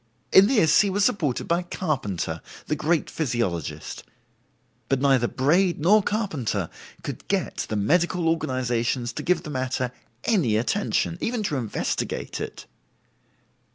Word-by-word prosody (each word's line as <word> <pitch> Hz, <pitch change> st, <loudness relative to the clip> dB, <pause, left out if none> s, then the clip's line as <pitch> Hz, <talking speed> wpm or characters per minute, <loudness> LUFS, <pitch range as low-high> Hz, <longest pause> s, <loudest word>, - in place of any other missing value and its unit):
In 195 Hz, +1 st, +8 dB
this 210 Hz, -, +5 dB
he 205 Hz, -, +1 dB
was 195 Hz, +1 st, +2 dB
supported 150 Hz, -11 st, 0 dB
by 170 Hz, +1 st, +2 dB
Carpenter, 120 Hz, -, -2 dB, 0.2 s
the 150 Hz, -, -1 dB
great 155 Hz, +2 st, +1 dB
physiologist; 115 Hz, -, -2 dB, 0.9 s
but 135 Hz, -, +2 dB
neither 135 Hz, -3 st, +3 dB
Braid 170 Hz, +9 st, +2 dB
nor 200 Hz, +8 st, +5 dB
Carpenter 150 Hz, -, -2 dB, 0.3 s
could -, -, -6 dB
get -, -, -1 dB
the 110 Hz, -, -1 dB
medical 170 Hz, -, +2 dB
organizations 125 Hz, -5 st, 0 dB
to -, -, -4 dB
give 180 Hz, -1 st, +1 dB
the 150 Hz, -, -6 dB
matter 130 Hz, -2 st, -1 dB, 0.3 s
any 150 Hz, -, +2 dB
attention, 170 Hz, -, 0 dB
even 235 Hz, -2 st, -1 dB
to 155 Hz, -, -1 dB
investigate 115 Hz, -5 st, -3 dB
it. -, -, -6 dB
150 Hz, 130 wpm, -25 LUFS, 120-180 Hz, 0.9 s, In